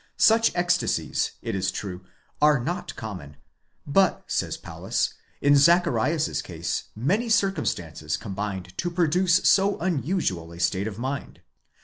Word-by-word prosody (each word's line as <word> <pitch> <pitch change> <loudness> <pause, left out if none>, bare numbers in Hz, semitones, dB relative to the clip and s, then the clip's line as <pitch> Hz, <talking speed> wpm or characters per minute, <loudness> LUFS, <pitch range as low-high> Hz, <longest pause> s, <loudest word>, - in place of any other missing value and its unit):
* - - -48
Such 225 0 +3
ecstasies, 175 0 0
it - - -3
is 95 -1 0
true, 95 -1 -6 0.4
are 150 -2 +5
not 170 +9 -4
common; 90 - -8 0.5
but, 185 +6 +2
says. - - -2
Paulus, - - -2 0.3
in 145 0 +5
Zacharias's 170 0 +3
case 85 -1 -4
many 195 - 0
circumstances 90 - 0
combined 95 -3 -5
to 175 - 0
produce 175 +1 +2
so 195 +1 +4
un 170 -5 0
usual 95 - -2
a 85 - -11
state 95 +3 0
of 105 -2 -6
mind. 135 +4 -5
140 Hz, 135 wpm, -25 LUFS, -, 0.5 s, are